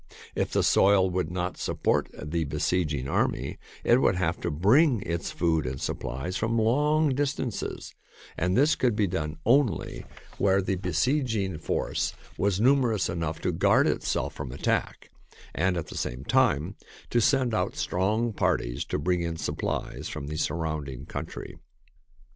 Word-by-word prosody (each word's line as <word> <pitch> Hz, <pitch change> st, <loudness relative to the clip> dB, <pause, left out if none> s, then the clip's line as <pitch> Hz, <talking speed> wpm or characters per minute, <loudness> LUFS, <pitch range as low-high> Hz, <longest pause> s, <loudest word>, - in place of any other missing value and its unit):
If -, -, -1 dB
the -, -, +1 dB
soil 95 Hz, -1 st, +4 dB
would 90 Hz, -3 st, -1 dB
not 90 Hz, 0 st, -3 dB
support -, -, 0 dB
the 80 Hz, +2 st, -2 dB
besieging 75 Hz, -1 st, -1 dB
army, 65 Hz, -1 st, -1 dB, 0.2 s
it 120 Hz, +2 st, +4 dB
would -, -, +3 dB
have 85 Hz, -2 st, 0 dB
to -, -, -1 dB
bring 110 Hz, -, +4 dB
its 85 Hz, 0 st, -3 dB
food 80 Hz, -5 st, 0 dB
and 65 Hz, +1 st, -4 dB
supplies 70 Hz, +9 st, -4 dB
from 115 Hz, +2 st, 0 dB
long 150 Hz, +7 st, +3 dB
distances, 135 Hz, -2 st, -2 dB, 0.4 s
and 90 Hz, +2 st, 0 dB
this 145 Hz, +4 st, +5 dB
could 120 Hz, -4 st, +1 dB
be 105 Hz, -, +2 dB
done 75 Hz, -4 st, -3 dB
only 120 Hz, -, +1 dB, 0.3 s
where 95 Hz, -1 st, +3 dB
the 95 Hz, 0 st, 0 dB
besieging 90 Hz, -, +1 dB
THE 130 Hz, -, -3 dB
TAKING 100 Hz, -5 st, -1 dB
OF 80 Hz, -, -8 dB
CITIES -, -, -17 dB
force -, -, -1 dB, 0.2 s
was 100 Hz, -1 st, +1 dB
numerous 120 Hz, -4 st, +3 dB
enough 85 Hz, -2 st, -3 dB
to -, -, 0 dB
guard -, -, +3 dB
itself -, -, -1 dB
from 65 Hz, -, -6 dB
attack 70 Hz, -, -2 dB, 0.4 s
and 90 Hz, +2 st, +1 dB
at 85 Hz, -, -2 dB
the -, -, -7 dB
same 60 Hz, +2 st, -3 dB
time 75 Hz, +6 st, +2 dB, 0.3 s
to 120 Hz, -, +3 dB
send 130 Hz, -1 st, +2 dB
out 110 Hz, -, 0 dB
strong 110 Hz, +5 st, 0 dB
parties -, -, 0 dB
to -, -, -2 dB
bring 90 Hz, +4 st, 0 dB
in 85 Hz, -1 st, -3 dB
supplies -, -, -3 dB
from 70 Hz, -, -5 dB
the 75 Hz, +2 st, -5 dB
surrounding 75 Hz, -5 st, -3 dB
country. -, -, -7 dB
90 Hz, 165 wpm, -27 LUFS, 80-115 Hz, 0.4 s, this